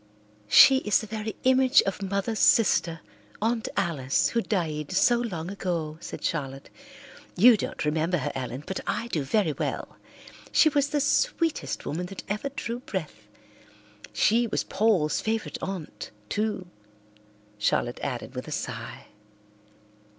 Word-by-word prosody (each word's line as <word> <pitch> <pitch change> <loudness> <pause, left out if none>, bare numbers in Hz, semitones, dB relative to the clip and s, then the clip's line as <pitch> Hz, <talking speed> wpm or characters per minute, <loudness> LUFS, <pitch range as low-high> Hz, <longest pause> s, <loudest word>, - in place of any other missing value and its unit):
"She 265 - +8
is 210 -6 +2
the 220 - -6
very 215 0 -5
image 260 +1 +5
of 195 +1 -3
Mother's 200 +3 -2
sister, 170 -7 +3 0.4
Aunt 225 +1 0
Alice, 150 -9 +1
who 235 - 0
died 155 -9 -2
so 240 +6 +4
long 185 -8 -4
ago," 165 -6 -3
said - - -8
Charlotte. 135 -4 -3 0.6
"You 235 +6 +7
don't 195 - -4
remember 160 +4 +1
her, 140 - -2
Ellen, 130 +1 -5
but 190 - -4
I 235 - -2
do 155 - -1
very 160 +3 +1
well. - - -4 0.5
She 315 - +5
was 285 -1 +1
the 295 - 0
sweetest 330 - 0
woman 175 +5 -3
that 195 - -8
ever 210 +7 -2
drew 240 -3 -5
breath. 160 - -6 0.8
She 235 +2 +3
was - - -1
Paul's 190 -8 +1
favourite 220 0 -2
aunt, 185 -5 -6 0.2
too," 210 -3 -2 0.9
Charlotte - - 0
added - - -4
with - - -6
a - - -7
sigh. - - -5
200 Hz, 140 wpm, -26 LUFS, 160-230 Hz, 0.9 s, She